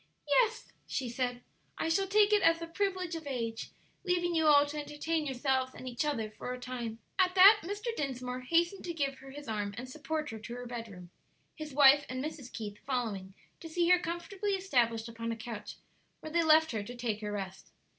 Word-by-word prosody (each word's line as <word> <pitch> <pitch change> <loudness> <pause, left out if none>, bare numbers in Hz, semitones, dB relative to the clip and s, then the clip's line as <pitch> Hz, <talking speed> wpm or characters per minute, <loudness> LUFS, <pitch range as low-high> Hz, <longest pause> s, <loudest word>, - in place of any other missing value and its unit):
"Yes," 465 -2 +2
she 260 - -2
said, 245 0 -2 0.3
"I - - -1
shall 385 +4 +2
take 415 +1 +4
it 415 - +5
as 330 -3 +5
the 335 - -5
privilege 370 0 -2
of 325 -3 -5
age, 230 -4 -3 0.3
leaving 350 -2 +1
you 320 -1 +3
all 290 -1 +7
to 295 +1 -5
entertain 300 +1 -2
yourselves 260 0 0
and 255 - -8
each 245 +2 -2
other 230 -8 -2
for 245 - -6
a 250 - -5
time." 245 -3 -5 0.2
At 365 0 +3
that 395 +3 +9
Mr. 415 +6 -4
Dinsmore 255 - -3
hastened 340 +8 +1
to 340 -1 -4
give 275 -3 -1
her 270 - -12
his 290 +1 -9
arm 205 -2 -2
and 250 +2 -5
support 305 +1 -4
her 220 - -7
to 235 +2 -7
her 245 0 -7
bedroom, 220 -7 -8 0.4
his 310 -1 -7
wife 285 +1 +7
and 255 +2 -3
Mrs. 285 -5 -7
Keith 210 -2 -6
following 210 -8 -3 0.2
to 330 - -9
see 340 +1 +1
her 360 0 +7
comfortably 355 +4 -3
established 240 -12 +1
upon 230 0 -4
a - - -2
couch, 225 -1 -7 0.5
where 310 - -7
they 340 +1 +3
left 315 0 +5
her 220 -3 -2
to 240 +5 -8
take 230 -3 -2
her 210 -1 -3
rest. 195 -2 -6
275 Hz, 205 wpm, -31 LUFS, 235-335 Hz, 0.5 s, that